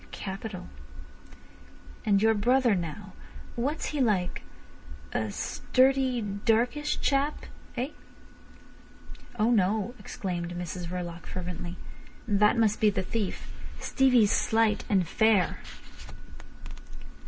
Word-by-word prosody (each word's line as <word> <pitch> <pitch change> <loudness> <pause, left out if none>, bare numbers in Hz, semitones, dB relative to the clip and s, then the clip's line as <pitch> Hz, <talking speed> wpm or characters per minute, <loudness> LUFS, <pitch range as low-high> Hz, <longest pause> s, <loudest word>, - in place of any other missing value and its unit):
Capital. 195 0 -6 1.4
And 200 -1 +4
your 225 0 +5
brother 240 +3 +3
now, 185 +2 -4 0.4
what's 280 +6 -2
he 290 - 0
like—a 110 - -3
sturdy, 260 - +1
darkish 230 +8 0
chap—eh?" 275 -2 -2 1.5
"Oh 220 +2 +3
no," 215 +1 +2
exclaimed 175 -2 -4
Mrs 175 0 -5
Verloc 175 -1 -5
fervently. 180 -1 -5 0.5
"That 210 +2 +4
must 220 -2 +2
be 215 - +6
the 195 -2 -1
thief. 205 0 -3 0.3
Stevie's 250 -6 +4
slight 220 -1 +2
and 190 -4 +2
fair." 210 -4 +3
210 Hz, 90 wpm, -28 LUFS, 180-240 Hz, 1.5 s, be